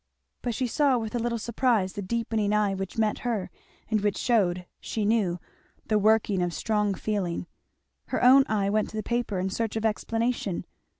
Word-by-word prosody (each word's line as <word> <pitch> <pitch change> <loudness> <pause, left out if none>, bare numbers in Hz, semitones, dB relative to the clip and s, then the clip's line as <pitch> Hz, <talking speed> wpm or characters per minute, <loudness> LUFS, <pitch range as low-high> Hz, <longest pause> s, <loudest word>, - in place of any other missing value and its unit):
But 240 -2 -2
she 260 - 0
saw 270 +1 +2
with 220 -2 -4
a 240 - 0
little 235 0 -1
surprise 230 -4 +1
the 205 - -4
deepening 215 0 -1
eye 210 -2 +2
which 195 +1 -5
met 215 -1 +1
her, 225 -6 -2 0.4
and 215 -2 +1
which 205 -1 0
shewed, 185 -7 +1
she 215 -2 -3
knew, 205 -5 +2 0.5
the 215 -1 +3
working 210 -2 +3
of 175 -1 -1
strong 210 -3 0
feeling. 185 -4 -2 0.6
Her - - -1
own 265 +2 +8
eye 200 -2 +1
went 215 0 +1
to 220 - -7
the 215 - -2
paper 235 -4 -1
in 190 +1 -1
search 225 +1 -2
of 220 0 -1
explanation. 225 -2 -1
215 Hz, 185 wpm, -27 LUFS, 200-230 Hz, 0.6 s, own